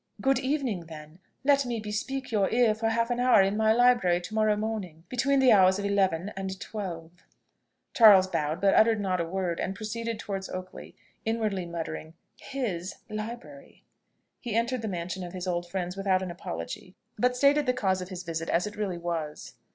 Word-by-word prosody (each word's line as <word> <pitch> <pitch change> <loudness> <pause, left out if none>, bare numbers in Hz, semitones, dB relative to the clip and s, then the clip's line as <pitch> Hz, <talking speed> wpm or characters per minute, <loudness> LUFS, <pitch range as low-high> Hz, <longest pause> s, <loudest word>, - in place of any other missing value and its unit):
"Good 270 +4 +2
evening, 260 - -2
then. 155 +1 -11 0.2
Let 280 0 +4
me 240 -3 -3
bespeak 230 +6 -4
your 205 -3 +2
ear 235 -2 +3
for 225 +1 -1
half 230 +1 0
an 245 - -1
hour 245 -5 +5
in 195 +2 0
my 220 0 +3
library 235 -7 +4
to 195 - -9
morrow 215 -1 +3
morning, 210 -7 -4
between 265 +3 +1
the 260 -2 +6
hours 190 -2 +6
of 200 - -3
eleven 195 -3 +1
and 190 0 -5
twelve." 175 -7 -6 0.8
Charles 205 -5 +8
bowed, 160 -3 -2
but 195 -1 +4
uttered 220 -1 +4
not 185 -3 0
a - - -1
word, 175 -1 -2
and 190 - -2
proceeded 230 +1 -4
towards 195 -2 -5
Oakley, 185 0 -8 0.3
inwardly 215 -5 -1
muttering 165 -1 -6 0.2
"his 200 -9 -4 0.2
library!" 235 +6 -8 0.6
He 235 -4 -4
entered 235 +2 0
the 220 - -3
mansion 180 -1 -4
of 175 0 -8
his 180 -1 -5
old 175 -1 -2
friends 180 0 -3
without 195 -1 +1
an 180 - -4
apology, 170 - -7 0.2
but 250 0 +2
stated 280 +2 +4
the - - +5
cause 190 -6 0
of 180 - -7
his 185 -1 -6
visit 165 -1 -4
as 175 - +2
it 210 - -6
really 200 -4 -2
was. 160 -5 -4
200 Hz, 190 wpm, -28 LUFS, 180-230 Hz, 0.8 s, Charles